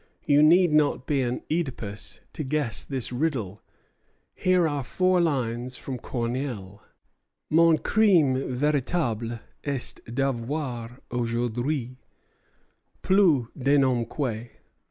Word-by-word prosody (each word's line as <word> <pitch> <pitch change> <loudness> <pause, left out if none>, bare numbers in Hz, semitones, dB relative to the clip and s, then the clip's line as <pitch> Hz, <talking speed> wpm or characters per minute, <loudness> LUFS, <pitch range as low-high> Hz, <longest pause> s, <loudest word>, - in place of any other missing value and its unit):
You 145 -1 +5
need 170 +3 +6
not 150 -4 +2
be 140 -3 +1
an 125 -1 -2
Œdipus 125 -10 -3
to 155 - -4
guess 140 -5 -1
this 130 -4 -4
riddle. 120 - -2 0.7
Here 180 -2 +2
are 145 -3 -2
four 185 +6 +2
lines 125 -5 -1
from 130 -2 -6
Corneille: 115 -5 -4 0.7
"'Mon 165 0 +5
crime 185 -12 +4
véritable 130 -3 -1 0.2
est 140 -3 -3
d'avoir 125 -1 -2
aujourd'hui 120 +2 -2 1.0
Plus 180 - +4
de 140 +2 +2
nom 130 -3 +2
que 120 -4 -3
130 Hz, 105 wpm, -26 LUFS, 120-150 Hz, 1.0 s, need